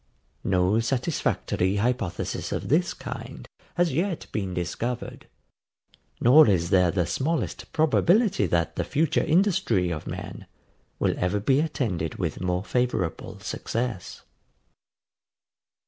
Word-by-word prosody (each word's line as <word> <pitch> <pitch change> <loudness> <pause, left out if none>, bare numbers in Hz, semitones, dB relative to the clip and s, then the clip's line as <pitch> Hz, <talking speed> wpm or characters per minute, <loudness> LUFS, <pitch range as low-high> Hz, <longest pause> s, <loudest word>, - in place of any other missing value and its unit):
No 95 +3 +2
satisfactory 120 - 0
hypothesis 110 -3 -2
of - - -3
this - - +2
kind - - -8 0.3
has 175 -3 +2
yet 175 +3 -1
been 100 -4 -2
discovered; 115 +8 -4 0.9
nor 130 +2 +7
is 85 -2 +1
there 90 -2 +5
the 90 0 0
smallest 155 - -2
probability 175 - +3
that 85 -2 0
the - - +1
future 155 +1 +1
industry 155 - +2
of 75 -2 -5
men - - -7 0.5
will - - +1
ever 90 +3 0
be 130 +7 +2
attended 110 - -2
with 85 -3 -3
more 90 0 -1
favourable 125 -7 -2
success. 115 -6 -4
110 Hz, 115 wpm, -26 LUFS, 90-150 Hz, 0.9 s, nor